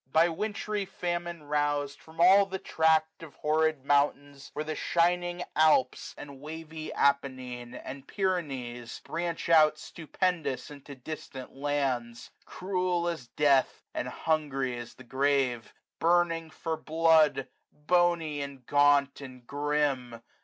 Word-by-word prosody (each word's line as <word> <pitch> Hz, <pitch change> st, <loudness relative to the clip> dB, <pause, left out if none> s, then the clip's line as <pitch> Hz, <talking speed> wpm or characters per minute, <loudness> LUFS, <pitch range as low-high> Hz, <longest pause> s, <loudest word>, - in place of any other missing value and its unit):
By 165 Hz, +2 st, +5 dB
wintry 210 Hz, +3 st, -3 dB
famine 175 Hz, -2 st, -4 dB
rous'd, 145 Hz, -1 st, -1 dB
from 160 Hz, +1 st, -16 dB
all 195 Hz, +3 st, +7 dB
the 190 Hz, 0 st, -4 dB
tract 160 Hz, -2 st, +1 dB
Of 155 Hz, -5 st, -11 dB
horrid 155 Hz, -2 st, +1 dB
mountains 145 Hz, -1 st, 0 dB
which 150 Hz, -, -3 dB
the 155 Hz, -, -3 dB
shining 175 Hz, +2 st, +1 dB
Alps, 155 Hz, -4 st, +3 dB
39a -, -, -8 dB
And 140 Hz, -2 st, -12 dB
wavy 160 Hz, +1 st, -7 dB
Appenine, 130 Hz, -3 st, 0 dB
and 135 Hz, +1 st, -8 dB
Pyrenees^ 135 Hz, -, -3 dB
Branch 170 Hz, 0 st, -3 dB
out 155 Hz, -2 st, +6 dB
stupendous 160 Hz, -4 st, -3 dB
into 140 Hz, -1 st, -10 dB
distant 130 Hz, -1 st, -8 dB
lands; 135 Hz, -4 st, -2 dB
Cruel 180 Hz, -2 st, -1 dB
as 160 Hz, -8 st, -4 dB
death, 140 Hz, 0 st, +2 dB
and -, -, -3 dB
hungry 140 Hz, -5 st, -1 dB
as 120 Hz, -1 st, -8 dB
the 130 Hz, -, -13 dB
grave! 135 Hz, -2 st, 0 dB, 0.3 s
Burning 165 Hz, -1 st, +2 dB
for 160 Hz, +1 st, -4 dB
blood! 160 Hz, -4 st, +3 dB, 0.2 s
bony, 165 Hz, -1 st, +1 dB
and 140 Hz, -3 st, -7 dB
gaunt, 145 Hz, 0 st, +3 dB
and 130 Hz, -3 st, -11 dB
grim! 140 Hz, -4 st, -1 dB
150 Hz, 125 wpm, -29 LUFS, 135-165 Hz, 0.3 s, all